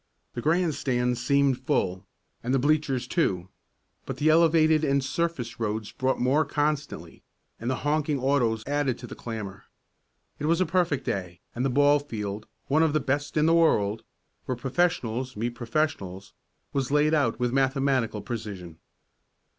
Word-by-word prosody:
The 120 Hz, -, -4 dB
grandstands 130 Hz, -7 st, 0 dB
seemed 140 Hz, -2 st, +3 dB
full, 95 Hz, -9 st, -1 dB, 0.3 s
and 125 Hz, +3 st, 0 dB
the -, -, +4 dB
bleachers 135 Hz, -2 st, +1 dB
too, 95 Hz, -, 0 dB, 0.6 s
but -, -, -4 dB
the 155 Hz, -, +2 dB
elevated 160 Hz, -1 st, +4 dB
and 140 Hz, -2 st, +2 dB
surface 140 Hz, -6 st, -2 dB
roads 110 Hz, -1 st, -2 dB
brought 130 Hz, 0 st, -1 dB
more 135 Hz, +5 st, +3 dB
constantly, 150 Hz, 0 st, -2 dB, 0.4 s
and 115 Hz, -, -3 dB
the 130 Hz, -, +1 dB
honking 150 Hz, -1 st, +1 dB
autos 125 Hz, -5 st, +1 dB
added 145 Hz, -3 st, 0 dB
to 120 Hz, -, -9 dB
the -, -, -8 dB
clamor. 105 Hz, -5 st, -7 dB, 0.7 s
It 150 Hz, -, -2 dB
was 165 Hz, +1 st, +3 dB
a 185 Hz, -, +3 dB
perfect 170 Hz, -5 st, 0 dB
day, 90 Hz, -3 st, -3 dB
and 120 Hz, -, -2 dB
the 135 Hz, -, +2 dB
ball 145 Hz, +3 st, +4 dB
field 105 Hz, -6 st, -5 dB, 0.2 s
one 150 Hz, +3 st, +2 dB
of 160 Hz, -2 st, +3 dB
the 155 Hz, -, +3 dB
best 145 Hz, +2 st, -2 dB
in 150 Hz, -, +4 dB
the 165 Hz, -, +4 dB
world 110 Hz, -11 st, +3 dB, 0.4 s
where 130 Hz, -, -2 dB
professionals 130 Hz, -3 st, -1 dB
meet 120 Hz, +3 st, -1 dB
professionals 115 Hz, -7 st, -3 dB, 0.4 s
was 135 Hz, -3 st, -1 dB
laid 150 Hz, +2 st, +3 dB
out 140 Hz, -8 st, +1 dB
with 125 Hz, 0 st, 0 dB
mathematical 135 Hz, -5 st, +1 dB
precision. 100 Hz, -7 st, -6 dB
135 Hz, 155 wpm, -26 LUFS, 115-150 Hz, 0.7 s, the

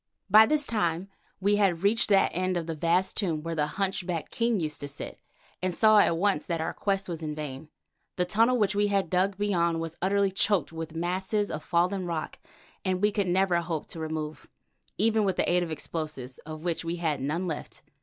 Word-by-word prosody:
By 215 Hz, +2 st, +9 dB
this 300 Hz, +1 st, +3 dB
time 185 Hz, -5 st, -1 dB, 0.3 s
we 205 Hz, +2 st, +2 dB
had 190 Hz, -4 st, +2 dB
reached 215 Hz, +3 st, +3 dB
that 195 Hz, -2 st, +4 dB
end 185 Hz, +1 st, 0 dB
of 170 Hz, -, -2 dB
the 165 Hz, -, -3 dB
vast 170 Hz, +4 st, +1 dB
tomb 165 Hz, -7 st, -1 dB
where 165 Hz, 0 st, -3 dB
the 150 Hz, -2 st, -1 dB
hunchbacked 185 Hz, -4 st, -2 dB
king 230 Hz, -2 st, +1 dB
used 155 Hz, -3 st, -2 dB
to 145 Hz, -, -4 dB
sit, 140 Hz, -, -7 dB, 0.4 s
and 185 Hz, -1 st, -1 dB
saw 215 Hz, -1 st, +6 dB
at 170 Hz, -4 st, +3 dB
once 195 Hz, -4 st, +1 dB
that 170 Hz, -2 st, -1 dB
our 160 Hz, -, -2 dB
quest 195 Hz, -1 st, -1 dB
was 170 Hz, -2 st, -5 dB
vain. 150 Hz, -2 st, -5 dB, 0.5 s
The 180 Hz, -, +1 dB
tunnel 225 Hz, +6 st, +3 dB
which 210 Hz, -2 st, +2 dB
we 205 Hz, 0 st, +2 dB
had 195 Hz, -4 st, 0 dB
dug 190 Hz, +2 st, +1 dB
beyond 170 Hz, -5 st, +1 dB
was 165 Hz, 0 st, -5 dB
utterly 195 Hz, +1 st, +2 dB
choked 195 Hz, -4 st, +1 dB
with 160 Hz, 0 st, -6 dB
masses 190 Hz, +5 st, -1 dB
of 155 Hz, -, -5 dB
fallen 180 Hz, +2 st, +1 dB
rock 165 Hz, -2 st, -4 dB, 0.4 s
that 185 Hz, -1 st, 0 dB
we 210 Hz, +2 st, +3 dB
could 200 Hz, -2 st, 0 dB
never 180 Hz, -1 st, +2 dB
hope 165 Hz, -3 st, -3 dB
to 165 Hz, -, -7 dB
move, 155 Hz, -1 st, -5 dB, 0.5 s
even 220 Hz, +1 st, +3 dB
with 190 Hz, -3 st, +1 dB
the -, -, +1 dB
aid 180 Hz, 0 st, +3 dB
of 175 Hz, -, -2 dB
explosives, 150 Hz, -4 st, -5 dB
of 155 Hz, 0 st, -7 dB
which 170 Hz, -2 st, -1 dB
we 165 Hz, +1 st, -2 dB
had 160 Hz, -4 st, -1 dB
none 155 Hz, +7 st, -1 dB
left. 160 Hz, -4 st, -6 dB
180 Hz, 205 wpm, -28 LUFS, 160-200 Hz, 0.5 s, By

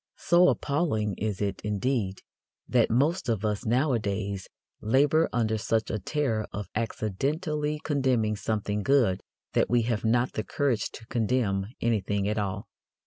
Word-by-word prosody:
So 175 Hz, +1 st, +4 dB
appalling 140 Hz, -, 0 dB
is 105 Hz, -1 st, -2 dB
it, 100 Hz, -2 st, -2 dB
indeed, 105 Hz, -1 st, -1 dB, 0.4 s
that 120 Hz, -2 st, +3 dB
most 140 Hz, +6 st, +1 dB
of 110 Hz, -2 st, 0 dB
us 105 Hz, 0 st, -1 dB
nowadays 105 Hz, -7 st, 0 dB, 0.3 s
labour 145 Hz, +8 st, +3 dB
under 110 Hz, -2 st, 0 dB
such 110 Hz, 0 st, 0 dB
a 110 Hz, -, -1 dB
terror 115 Hz, -1 st, -1 dB
of 105 Hz, 0 st, -5 dB
accidentally 150 Hz, -, -1 dB
condemning 130 Hz, -7 st, +1 dB
something 105 Hz, 0 st, -2 dB
good 120 Hz, -7 st, +3 dB, 0.3 s
that -, -, +2 dB
we 120 Hz, -1 st, +3 dB
have 115 Hz, -2 st, -1 dB
not 120 Hz, +2 st, +2 dB
the 110 Hz, -, -2 dB
courage 130 Hz, +2 st, 0 dB
to 115 Hz, -, -10 dB
condemn 110 Hz, -4 st, 0 dB
anything 105 Hz, -3 st, 0 dB
at 105 Hz, +1 st, 0 dB
all. 100 Hz, -1 st, -3 dB
110 Hz, 140 wpm, -27 LUFS, 105-135 Hz, 0.4 s, So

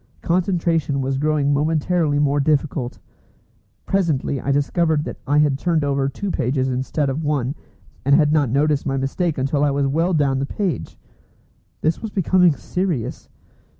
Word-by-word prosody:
Concentration 170 Hz, -5 st, 0 dB
was 135 Hz, 0 st, -1 dB
growing 150 Hz, -1 st, +1 dB
momentarily 155 Hz, +1 st, +1 dB
more 145 Hz, 0 st, +2 dB
difficult. 140 Hz, -3 st, 0 dB, 0.9 s
Presently 155 Hz, -8 st, 0 dB
I 140 Hz, -, -1 dB
discovered 150 Hz, +2 st, +1 dB
that -, -, -7 dB
I 145 Hz, +2 st, +2 dB
had 145 Hz, -2 st, +3 dB
turned 165 Hz, -3 st, +1 dB
over 140 Hz, -1 st, 0 dB
two 195 Hz, +8 st, -4 dB
pages 130 Hz, -1 st, 0 dB
instead 130 Hz, +3 st, -1 dB
of 135 Hz, +4 st, -2 dB
one, 140 Hz, -3 st, 0 dB, 0.5 s
and 140 Hz, +1 st, +4 dB
had 150 Hz, -1 st, +3 dB
not 150 Hz, -5 st, +2 dB
noticed 145 Hz, +3 st, +1 dB
my 135 Hz, 0 st, 0 dB
mistake 150 Hz, +5 st, -1 dB
until 140 Hz, +2 st, 0 dB
I 145 Hz, -, +3 dB
was 140 Hz, 0 st, 0 dB
well 165 Hz, +6 st, +1 dB
down 140 Hz, -3 st, +1 dB
the 140 Hz, -, -2 dB
page. 195 Hz, -1 st, -3 dB, 0.8 s
This 160 Hz, +2 st, 0 dB
was 225 Hz, -, -4 dB
becoming 185 Hz, -3 st, +3 dB
serious. 175 Hz, -, -3 dB
145 Hz, 155 wpm, -21 LUFS, 140-165 Hz, 0.9 s, and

